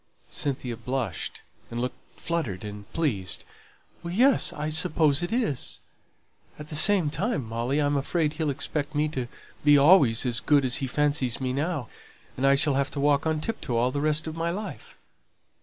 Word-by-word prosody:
Cynthia 130 -4 -3
blushed, 125 +1 -4 0.3
and 120 - -4
looked 125 +1 -6
fluttered 155 - -3
and 105 +1 -9
pleased. 115 - -1 0.6
"Yes, 235 +11 +3
I 150 +1 -4
suppose 155 -1 +2
it 175 - -3
is. 225 - -1 0.8
At 150 0 -10
the 150 - -3
same 170 -1 +4
time, 155 - -2
Molly, 120 +5 -1
I'm 145 -1 +1
afraid 150 +2 0
he'll 160 -2 -1
expect 145 +2 -2
me 150 +1 +2
to 130 -5 -4 0.4
be 145 0 +6
always 140 -6 +5
as 120 -1 +2
good 145 -2 +3
as 125 0 +1
he 135 - -2
fancies 145 -3 0
me 130 -1 -2
now, 145 -2 -2 0.5
and 135 +2 +1
I 140 - +6
shall 145 0 +2
have 140 0 0
to 145 - -4
walk 145 +2 +2
on 155 -1 0
tiptoe 140 - -3
all 125 +2 +2
the 140 +1 -2
rest 155 +1 +1
of 160 -1 -5
my 165 +1 -1
life." 205 +5 -6
145 Hz, 175 wpm, -26 LUFS, 130-160 Hz, 0.8 s, be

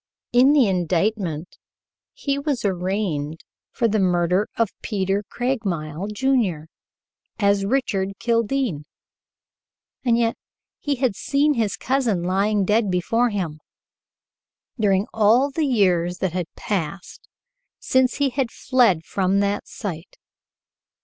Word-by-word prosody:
In 255 +4 +6
the 275 -7 +5
indictment 180 -2 -1 0.5
he 280 -1 -2
was 280 -6 -2
arraigned 180 -5 -2 0.3
for 235 - 0
the 215 0 +1
murder 180 +1 +2
of 230 -3 +2
Peter 195 -1 -1
Craigmile, 195 - -2
Jr., 210 - +1 0.8
as 200 -2 +2
Richard 200 -5 0
Kildene, 230 - 0 1.2
and 235 -3 +3
yet 230 -1 +1 0.4
he 290 -1 -1
had 250 -5 0
seen 285 +6 +1
his 225 -6 -1
cousin 240 -9 0
lying 195 +3 +1
dead 210 +1 +2
before 225 +7 +1
him, 175 -8 -3 1.2
during 200 -2 +2
all 225 +6 +4
the 305 +1 0
years 180 -7 +2
that 185 -3 -2
had 180 -2 -2
passed 190 -2 -4 0.5
since 260 0 +2
he 280 -2 +1
had 255 -1 -1
fled 230 - +2
from 195 0 +1
that 200 0 -1
sight. 175 -6 -7
205 Hz, 115 wpm, -22 LUFS, 185-245 Hz, 1.2 s, In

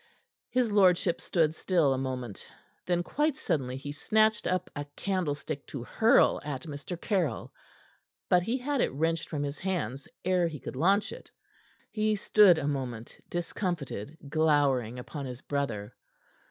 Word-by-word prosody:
His 245 -3 +1
lordship 180 -3 +4
stood 160 -3 +2
still 165 -5 +2
a - - -1
moment. 125 -5 -4 0.4
Then, 175 -1 +1
quite 295 - 0
suddenly, 130 - -1
he 145 +1 -6
snatched 215 +8 +2
up 185 0 0
a 145 0 -4
candlestick 155 -7 -2
to 135 -5 -6
hurl 225 - +4
at 140 -3 -4
Mr. 150 +3 -6
Caryll. 175 - -1 0.7
But 180 - +4
he 230 +8 -1
had 275 +1 -1
it - - +1
wrenched 165 +3 0
from 145 -3 -2
his 145 +1 -4
hands 150 - -3 0.2
ere 180 -2 +3
he 155 -3 -6
could - - -7
launch 195 - +2
it. - - -10 0.6
He 215 0 +1
stood 205 -3 +6
a 145 -2 -2
moment, 125 -5 -4
discomfited, 165 - -3
glowering 140 -6 +2
upon 140 +2 -6
his 125 0 -8
brother. 115 -8 -3
160 Hz, 150 wpm, -29 LUFS, 140-185 Hz, 0.7 s, stood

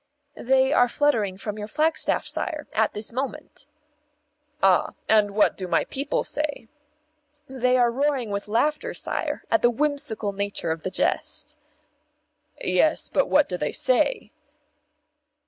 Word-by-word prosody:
"They 265 +2 +3
are 245 -4 +5
fluttering 225 -10 +1
from 210 +1 -6
your 210 - -5
flagstaff, 315 +7 +1
sire, 310 -4 -4
at 220 0 +1
this 210 +2 -4
moment." 275 +2 -5 1.0
"Ah! 190 -2 +3
And 210 -2 +3
what 210 - +3
do 185 - -5
my - - +2
people 280 +2 -2
say?" 295 -6 -3 0.8
"They 255 -1 +1
are 240 -1 +3
roaring 270 -3 -1
with 200 +1 -3
laughter, 265 +8 0
sire, - - -2
at 335 - +3
the 240 - +5
whimsical 240 -6 -1
nature 200 -4 -2
of 160 0 -3
the 185 - -3
jest." 185 - -1 1.1
"Yes, - - +2
but - - +1
what - - +4
do - - -3
they - - -2
say?" - - +1
240 Hz, 140 wpm, -24 LUFS, 210-290 Hz, 1.1 s, are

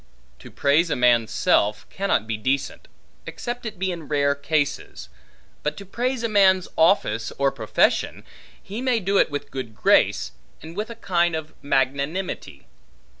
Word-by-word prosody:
To - - -12
praise 150 +5 +2
a - - 0
man's 120 -2 +3
self, 105 -2 +1
cannot 195 - 0
be 110 -1 -2
decent, 130 +6 -2 0.4
except 240 -1 -5
it 215 -2 -7
be 190 +1 -1
in 165 -4 -7
rare 140 -1 +2
cases; 145 - -2 0.5
but 150 0 -2
to 200 - -9
praise 245 +5 -2
a - - +2
man's 190 -4 +4
office 115 - +2
or 140 0 +2
profession, 115 -5 +1 0.4
he 210 +5 -7
may 255 -3 +1
do 195 0 +1
it - - +3
with 145 -1 -5
good 125 -5 -6
grace, 60 - +3 0.3
and 160 +2 -10
with 210 +3 -3
a 235 - -7
kind 175 -5 +1
of 160 0 -6
magnanimity. 140 +6 -2
160 Hz, 160 wpm, -23 LUFS, 135-195 Hz, 0.5 s, man's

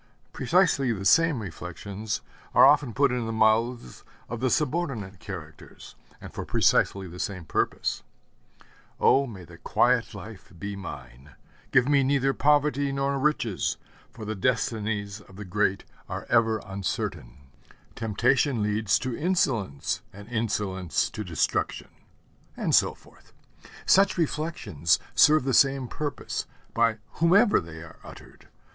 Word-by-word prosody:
Precisely 140 -3 +2
the 100 -3 -4
same 160 -3 +4
reflections 100 +4 -5 0.3
are - - +8
often 140 -2 +4
put 140 +3 +2
in 125 -2 -2
the - - -2
mouths 110 - +1 0.3
of 120 - -4
the 130 +2 +1
subordinate 125 - -1
characters, 85 -6 -10 0.3
and - - -11
for - - -5
precisely 95 -1 +2
the 90 +1 -10
same 95 -4 -4
purpose. - - -1 1.0
'Oh, 135 0 +4
may 100 -6 -9
the 85 0 -15
quiet 120 +3 +1
life 100 +1 -11
be 100 +4 -5
mine! 70 -7 -10 0.4
Give 130 -1 +4
me 140 -1 +4
neither 135 0 +2
poverty 145 -1 +2
nor 135 0 -1
riches: 130 -9 0 0.3
for 110 - -10
the 110 - -3
destinies 105 -2 -1
of 95 -1 -17
the 105 +1 -8
great 100 +1 0 0.3
are - - -5
ever 115 -2 +3
uncertain.' 95 -10 -4 0.6
'Temptation 120 +3 +1
leads 105 -1 +1
to 130 -2 -4
insolence, 120 - 0
and 100 +2 -12
insolence 105 -6 -1
to 110 - -5
destruction'; 85 -5 -2 0.6
and - - -1
so - - +4
forth. - - -22 0.5
Such 195 0 +4
reflections 155 - 0 0.2
serve 155 -2 +5
the 135 0 -1
same 135 -1 +3
purpose, 145 +3 -4 0.3
by 115 -1 +2 0.2
whomever 185 +5 +5
they 80 -1 -9
are 85 - -14
uttered. - - -14
110 Hz, 135 wpm, -26 LUFS, 95-135 Hz, 1.0 s, are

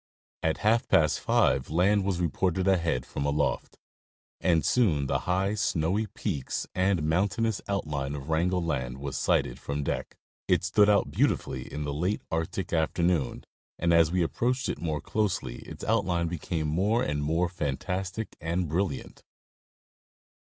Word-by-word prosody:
At 80 0 +1
half 115 +3 +3
past 75 -2 +3
five 65 0 +2
land 95 +6 +3
was 95 -2 -1
reported 90 +3 0
ahead 85 -9 +1
from 70 - -4
aloft, 70 +1 -1 0.6
and 85 -5 +2
soon 80 - +3
the - - 0
high 95 +3 +1
snowy 100 +1 0
peaks 90 - -3
and. 90 -3 +1
mountainous 100 +7 +1
outline 75 -8 -2
of 70 0 -7
Wrangel 85 +3 +1
land 65 -6 -2
was 70 -1 -5
sighted - - +1
from 70 +1 -3
deck. - - -3 0.3
It - - +3
stood 105 0 +4
out 100 -1 +3
beautifully 65 0 0
in 75 - -4
the 70 -1 -3
late 90 +8 -1
Arctic 80 +4 -2
afternoon, 80 -3 +1 0.3
and 85 0 +2
as 85 -1 +5
we 90 -1 +2
approached 125 +9 0
it - - -3
more 80 -4 -2
closely 105 -4 -1
its - - -10
outline 85 -2 +1
became 80 -1 -3
more 100 +10 +1
and 75 0 -1
more 80 +4 +1
fantastic 90 +6 -3
and 85 +2 -1
brilliant. 80 -3 -2
85 Hz, 150 wpm, -28 LUFS, 75-95 Hz, 0.6 s, as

